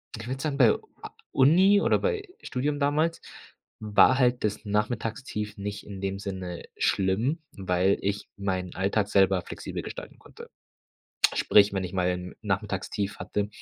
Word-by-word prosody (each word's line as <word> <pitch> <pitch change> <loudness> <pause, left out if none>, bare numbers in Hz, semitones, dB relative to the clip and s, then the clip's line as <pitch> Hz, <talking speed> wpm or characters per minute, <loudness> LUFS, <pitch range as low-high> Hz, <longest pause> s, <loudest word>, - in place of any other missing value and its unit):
Ich 115 +1 -8
würde 130 +1 -4
sagen, 145 -2 -2
bei 120 -6 +6
u - - -5 0.2
a - - -7 0.2
Uni 185 +9 +5
oder - - +3
bei 440 -4 -1
Studium 145 +3 -2
damals 155 +4 +1 0.6
war 110 +5 +4
halt 125 -2 +2
das 105 +1 -2
Nachmittagstief 105 0 -2
nicht 100 +1 -5
in 100 -2 -8
dem 95 0 -2
Sinne 95 -3 -5
schlimm, 110 - +1
weil 95 0 +1
ich 100 +1 -2
meinen 95 -2 -2
Alltag 100 +2 0
selber 95 -2 +3
flexibel - - -6
gestalten - - -8
konnte. - - -14 0.9
Sprich, 105 -1 +5
wenn 95 -1 -1
ich 90 - -6
mal 90 -1 +1
'n 90 0 -6
Nachmittagstief 100 0 -2
hatte, 105 0 -2
105 Hz, 155 wpm, -27 LUFS, 95-130 Hz, 0.9 s, bei